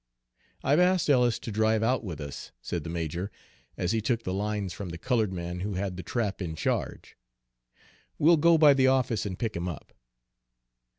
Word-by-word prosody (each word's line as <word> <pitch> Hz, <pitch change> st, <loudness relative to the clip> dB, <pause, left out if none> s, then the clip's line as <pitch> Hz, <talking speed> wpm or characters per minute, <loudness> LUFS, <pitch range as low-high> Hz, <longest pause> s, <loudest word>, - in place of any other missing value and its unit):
"I've 145 Hz, +4 st, +3 dB
asked 180 Hz, -3 st, +3 dB
Ellis 125 Hz, -4 st, +3 dB
to 115 Hz, -, -7 dB
drive 110 Hz, +1 st, +2 dB
out 125 Hz, +2 st, +1 dB
with 85 Hz, -7 st, -6 dB
us," 70 Hz, -3 st, -7 dB
said 85 Hz, -3 st, -4 dB
the 80 Hz, -, -6 dB
major, 85 Hz, +4 st, -3 dB, 0.5 s
as 90 Hz, -, 0 dB
he 115 Hz, -1 st, +1 dB
took 115 Hz, +1 st, 0 dB
the 95 Hz, -, -3 dB
lines 100 Hz, -1 st, -2 dB
from 100 Hz, -1 st, -6 dB
the 85 Hz, -, -6 dB
colored 110 Hz, 0 st, 0 dB
man 90 Hz, -1 st, -4 dB
who 100 Hz, +1 st, -3 dB
had 95 Hz, 0 st, -2 dB
the 90 Hz, -, -5 dB
trap 105 Hz, -1 st, -2 dB
in 80 Hz, -3 st, -3 dB
charge. -, -, -3 dB, 1.0 s
"We'll 165 Hz, +3 st, +5 dB
go 165 Hz, +2 st, +5 dB
by 150 Hz, -2 st, +7 dB
the 135 Hz, -1 st, +3 dB
office 130 Hz, -5 st, +1 dB
and 95 Hz, -2 st, -5 dB
pick 115 Hz, -2 st, -3 dB
him 85 Hz, +1 st, -2 dB
up." 80 Hz, -, -9 dB
105 Hz, 190 wpm, -28 LUFS, 90-125 Hz, 1.0 s, by